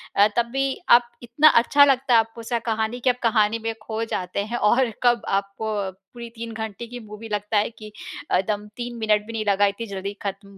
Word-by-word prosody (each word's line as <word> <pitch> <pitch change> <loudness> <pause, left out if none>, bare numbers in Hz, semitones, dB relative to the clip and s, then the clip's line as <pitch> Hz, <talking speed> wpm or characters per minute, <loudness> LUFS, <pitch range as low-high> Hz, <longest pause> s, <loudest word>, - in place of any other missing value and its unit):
अ, 200 +1 +6
तब 235 - +3
भी 270 0 -1
आप 240 0 +6
इतना 300 +6 +5
अच्छा 285 +4 +5
लगता 270 -2 +2
है 230 - +7
आपको 225 +1 -3
उसका 235 +1 -2
कहानी 220 +1 -2
कि 255 - +1
आप 250 0 0
कहानी 225 -1 +2
में 225 0 -1
खो 220 +1 -3
जाते 180 -3 -3
हैं 235 +3 -3
और 240 +3 +3
कब 240 -2 +4
आपको 200 +2 -2 0.2
पूरी 195 +6 -12
3 230 0 -6
घंटे 220 +1 -6
की 245 +1 -8
मूवी 210 +2 -10
लगता 210 +1 -1
है 205 - +2
कि 215 - -10 0.5
एकदम 205 +2 -1
3 240 0 -5
मिनट 210 -2 +1
भी 230 - -8
नहीं 220 -1 -3
लगा, 200 0 +3
इतनी 200 +3 -2
जल्दी 200 0 -5
ख़त्म 200 0 -6
225 Hz, 215 wpm, -23 LUFS, 205-240 Hz, 0.5 s, है